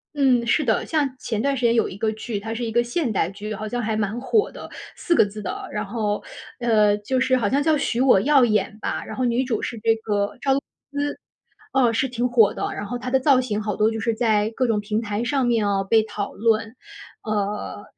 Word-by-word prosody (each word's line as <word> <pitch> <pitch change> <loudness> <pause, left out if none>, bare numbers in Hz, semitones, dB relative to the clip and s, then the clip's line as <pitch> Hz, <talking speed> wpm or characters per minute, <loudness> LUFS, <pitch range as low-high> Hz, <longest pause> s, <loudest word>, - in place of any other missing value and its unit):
嗯， 260 -4 +3
是 270 +6 +2
的， 220 -6 +1
像 290 -5 0
前 220 -4 -3
段 275 +2 0
时 245 - -1
间 230 - +4
有 235 - +2
一 185 - -9
个 220 +1 0
剧， 220 0 -5
它 220 +2 -5
是 235 +2 -4
一 230 - -2
个 240 +2 +2
现 240 +2 -1
代 185 -5 0
剧， 210 +2 -6
好 215 +1 -5
像 245 +2 -2
还 220 0 -1
蛮 215 +3 -2
火 415 - +1
的， - - -10 0.3
4 345 - 0
个 - - +5
字 210 +1 -8
的。 - - -5
然 210 - -2
后， 210 -1 -2 0.4
呃， 215 -4 +3
就 255 +5 -1
是 255 0 +3
好 225 -5 +1
像 280 +2 +1
叫 315 +1 +3
《许 240 - -1
我 255 -7 +5
耀 275 -1 +5
眼》 215 -2 0
吧， - - -3
然 - - -8
后 255 - 0
女 240 +2 +1
主 240 -4 -1
是 235 - -4
这 225 +1 +3
个 205 -1 -2
赵 270 0 +2
露 270 - +2
思。 - - -39 1.1
哦， 255 -3 +4
是 265 +4 +1
挺 245 0 -1
火 230 -4 +4
的， - - -3
然 - - -5
后 245 +4 -4
她 250 +1 -5
的 265 - +4
造 265 -1 +4
型 215 -4 -2
好 210 -2 -2
多 215 +1 +3
就 225 - -4
是 230 0 0
在 220 -2 +1
各 255 - +2
种 225 -3 +1
平 210 +1 -2
台 210 -1 -3
上 265 +1 +1
面 230 -3 +2
啊 200 -1 +1
被 220 +3 +4
讨 210 -2 -5
论。 225 +1 +1 0.5
呃， 210 -1 -3
225 Hz, 260 characters per minute, -23 LUFS, 210-255 Hz, 1.1 s, 个